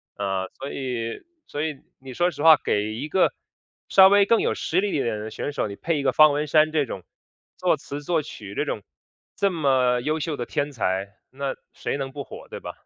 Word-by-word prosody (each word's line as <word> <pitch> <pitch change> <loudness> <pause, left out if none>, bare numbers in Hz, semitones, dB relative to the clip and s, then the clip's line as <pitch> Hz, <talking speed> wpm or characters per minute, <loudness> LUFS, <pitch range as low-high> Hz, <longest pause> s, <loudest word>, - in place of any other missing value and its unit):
呃， 95 -2 -2
所 135 - -5
以 120 -4 -4 0.2
所 145 +1 -3
以 150 -4 -3 0.2
你 130 -1 -10
说 175 +4 +1
实 145 0 -6
话， 160 -2 +9
给 105 +1 0
一 140 +6 -4
个 185 - +3 0.6
稍 190 -1 +8
微 200 0 +5
更 230 +2 +3
有 - - +1
实 180 +4 0
力 205 - 0
一 140 - 0
点 110 -2 -2
的 110 +1 -6
选 145 - -4
手， 110 - -1
你 100 - -7
配 165 -3 -1
一 - - -3
个 130 - +3
方 155 -1 +7
文 150 +1 -1
山 155 +1 +4
这 150 -3 +1
种 95 -6 -7 0.5
作 - - +2
词 145 +1 -7
作 165 0 +1
曲 100 -9 -9
这 - - 0
种 - - -4 0.5
这 200 - +2
么 130 -6 +2
优 155 +4 -1
秀 150 0 -2
的 120 - -3
天 145 +4 -2
才， 95 -4 -1 0.2
那 135 0 -3 0.2
谁 - - -3
能 135 -1 -4
不 140 0 -6
火， - - -11
对 - - -7
吧？ - - -8
140 Hz, 245 characters per minute, -24 LUFS, 120-155 Hz, 0.6 s, 话